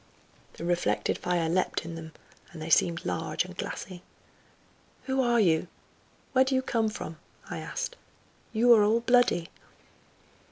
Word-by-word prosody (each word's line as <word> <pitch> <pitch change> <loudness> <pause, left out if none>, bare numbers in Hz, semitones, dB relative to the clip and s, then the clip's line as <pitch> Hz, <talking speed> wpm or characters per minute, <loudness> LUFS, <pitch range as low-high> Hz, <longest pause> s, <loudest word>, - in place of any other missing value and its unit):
The 170 - -7
reflected 175 0 0
fire 175 -2 0
leapt 175 -1 0
in 165 - -6
them, 160 -1 -8 0.4
and - - -10
they 160 +1 -5
seemed 170 +1 +3
large 90 -1 -1
and - - -10
glassy. 180 -1 -6 1.0
"Who 265 0 0
are 240 -2 +3
you? 170 -4 +3 0.7
Where 260 0 +6
do 265 0 0
you 260 - +1
come 225 -3 +1
from?" 165 -6 -7 0.3
I - - -3
asked; - - -4 0.5
"you 240 +2 +5
are 215 -2 +6
all 220 +3 +3
bloody." 245 -8 +3
190 Hz, 150 wpm, -28 LUFS, 165-245 Hz, 1.0 s, Where